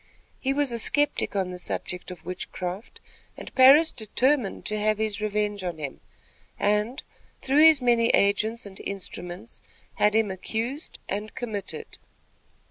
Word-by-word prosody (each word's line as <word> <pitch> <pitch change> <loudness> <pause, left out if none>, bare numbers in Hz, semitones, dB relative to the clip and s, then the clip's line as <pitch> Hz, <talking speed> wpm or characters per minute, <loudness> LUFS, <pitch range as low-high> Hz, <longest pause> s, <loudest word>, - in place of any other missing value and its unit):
He 270 - 0
was 280 -1 0
a 235 - -1
skeptic 290 -1 +2
on 190 -2 0
the 180 - -6
subject 180 0 -4
of 180 -3 -10
witchcraft, 180 +3 -6 0.4
and - - -9
Parris 280 +5 +7
determined 245 +1 0
to 215 -1 -1
have 215 0 +1
his 215 -1 -1
revenge 210 -1 -1
on 175 -3 -3
him, 145 -3 -6 0.6
and, 210 +5 0 0.4
through 275 +2 +2
his 315 -5 +7
many 235 -1 +4
agents 215 +4 +2
and 195 -1 -11
instruments, 195 +1 -6 0.4
had 210 0 +3
him 220 -3 +2
accused 230 - -4
and 210 +2 -4
committed. 220 -6 -6
215 Hz, 140 wpm, -26 LUFS, 195-245 Hz, 0.6 s, Parris